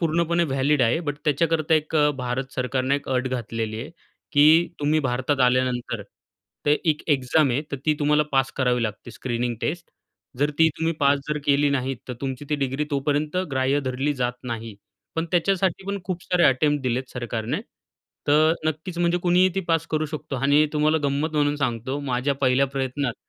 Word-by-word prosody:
पूर्णपणे 170 Hz, +1 st, +1 dB
व्हॅलिड 135 Hz, 0 st, +1 dB
आहे. 120 Hz, +8 st, +2 dB
बट 145 Hz, -4 st, -3 dB
त्याच्याकरता 155 Hz, +1 st, +2 dB
एक 155 Hz, 0 st, 0 dB
अ, 150 Hz, 0 st, +4 dB
भारत 130 Hz, +1 st, -3 dB
सरकारनं 130 Hz, +1 st, 0 dB
एक 145 Hz, -, -4 dB
अट 130 Hz, 0 st, 0 dB
घातलेली 115 Hz, -3 st, -3 dB
आहे, 140 Hz, -, -7 dB, 0.4 s
की 155 Hz, +4 st, +6 dB
तुम्ही 150 Hz, +2 st, +2 dB
भारतात 130 Hz, +2 st, 0 dB
आल्यानंतर 125 Hz, -1 st, +1 dB, 0.6 s
ते 145 Hz, -, +5 dB, 0.2 s
एक 150 Hz, -, -3 dB
एक्झाम 135 Hz, +1 st, +3 dB
आहे 125 Hz, +4 st, +1 dB
तर 140 Hz, -, -1 dB
ती 155 Hz, -, +5 dB
तुम्हाला 150 Hz, 0 st, +3 dB
पास 135 Hz, -1 st, +2 dB
करावी 125 Hz, -2 st, +1 dB
लागते 110 Hz, +1 st, -4 dB
स्क्रीनिंग 120 Hz, +1 st, -2 dB
टेस्ट. 170 Hz, +1 st, -3 dB, 0.5 s
जर 145 Hz, +2 st, +2 dB
ती 160 Hz, 0 st, +6 dB
तुम्ही 165 Hz, +1 st, +1 dB
पास 140 Hz, 0 st, +4 dB
जर 150 Hz, 0 st, -1 dB
केली 145 Hz, 0 st, +4 dB
नाही, 135 Hz, -1 st, -1 dB
तर -, -, -3 dB
तुमची 135 Hz, +1 st, -4 dB
ती 150 Hz, -, +3 dB
डिग्री 135 Hz, +1 st, -1 dB
तोपर्यंत 145 Hz, +3 st, -1 dB
ग्राह्य 135 Hz, +1 st, +1 dB
धरली 135 Hz, +2 st, -1 dB
जात 125 Hz, -2 st, -1 dB
नाही. 115 Hz, -2 st, -5 dB, 0.4 s
पण 165 Hz, -, 0 dB
त्याच्यासाठी 190 Hz, +1 st, +1 dB
पण 200 Hz, 0 st, -2 dB
खूप 180 Hz, -1 st, -4 dB
सारे 180 Hz, -1 st, +2 dB
अटेम्प्ट 145 Hz, +2 st, +3 dB
दिलेत 130 Hz, 0 st, -1 dB
सरकारने, 120 Hz, -2 st, -3 dB, 0.7 s
तर 155 Hz, +2 st, +5 dB
नक्कीच 160 Hz, +3 st, -3 dB
म्हणजे 175 Hz, 0 st, +2 dB
कुणीही 180 Hz, +1 st, +4 dB
ती 195 Hz, -, 0 dB
पास 165 Hz, 0 st, +1 dB
करू 155 Hz, 0 st, 0 dB
शकतो 150 Hz, -2 st, -5 dB
आणि 145 Hz, +3 st, +4 dB
तुम्हाला 155 Hz, +1 st, +3 dB
गंमत 140 Hz, +3 st, 0 dB
म्हणून 145 Hz, -1 st, +2 dB
सांगतो, 130 Hz, -1 st, -2 dB
माझ्या 135 Hz, 0 st, -1 dB
पहिल्या 130 Hz, +2 st, +3 dB
प्रयत्नात 135 Hz, -1 st, -2 dB
140 Hz, 180 wpm, -24 LUFS, 130-155 Hz, 0.7 s, की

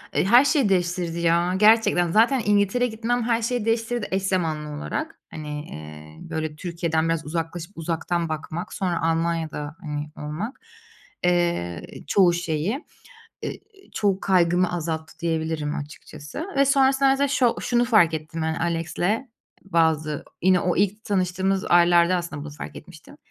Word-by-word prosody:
Eee, -, -, +2 dB
her 240 Hz, +7 st, +6 dB
şeyi 280 Hz, -8 st, +3 dB
değiştirdi 175 Hz, -2 st, 0 dB
ya, 170 Hz, +1 st, +2 dB
gerçekten. 210 Hz, -5 st, +4 dB
Zaten 235 Hz, +5 st, +4 dB
İngiltere'ye 205 Hz, +4 st, +2 dB
gitmem 230 Hz, +2 st, -1 dB
her 230 Hz, 0 st, +1 dB
şeyi 235 Hz, -1 st, -1 dB
değiştirdi, 230 Hz, 0 st, 0 dB
eş 190 Hz, 0 st, 0 dB
zamanlı 160 Hz, -6 st, -1 dB
olarak. 315 Hz, -, -4 dB
Hani, 150 Hz, -1 st, -6 dB
eee, 75 Hz, 0 st, -10 dB
böyle, 155 Hz, -1 st, -3 dB
Türkiye'den 165 Hz, -1 st, -1 dB
biraz 165 Hz, -1 st, -1 dB
uzaklaşıp 165 Hz, +3 st, -5 dB
uzaktan 165 Hz, +1 st, -2 dB
bakmak, 160 Hz, +4 st, -5 dB
sonra 180 Hz, -4 st, -1 dB
Almanya'da, 165 Hz, -2 st, -1 dB
hani, 150 Hz, 0 st, -5 dB, 0.2 s
olmak. 205 Hz, -, -5 dB, 0.6 s
Eee, 170 Hz, -, +1 dB, 0.3 s
çoğu 180 Hz, -2 st, +4 dB
şeyi, 175 Hz, -, -2 dB, 0.6 s
eee, -, -, -5 dB, 0.3 s
çoğu 195 Hz, -2 st, +1 dB
kaygımı 180 Hz, -1 st, +2 dB
azalttı 160 Hz, -1 st, -4 dB
diyebilirim 160 Hz, -3 st, -2 dB
açıkçası. 150 Hz, -, -8 dB
Ve 275 Hz, -, +5 dB
sonrasında 270 Hz, 0 st, +4 dB
mesela 280 Hz, +1 st, +2 dB
şo 255 Hz, -3 st, +2 dB
şunu 240 Hz, 0 st, +2 dB
fark 210 Hz, -9 st, +4 dB
ettim 160 Hz, +1 st, -5 dB
ben 160 Hz, 0 st, 0 dB
Alex'le, 170 Hz, +9 st, -1 dB, 0.4 s
bazı 160 Hz, -4 st, +1 dB, 0.2 s
yine 185 Hz, 0 st, +4 dB
o 180 Hz, -1 st, 0 dB
ilk 205 Hz, +2 st, 0 dB
tanıştığımız 190 Hz, -1 st, 0 dB
aylarda 175 Hz, 0 st, +5 dB
aslında 170 Hz, -4 st, -5 dB
bunu 150 Hz, -, -7 dB
fark 145 Hz, -, -9 dB
etmiştim. 175 Hz, -, -13 dB
175 Hz, 140 wpm, -24 LUFS, 160-210 Hz, 0.6 s, her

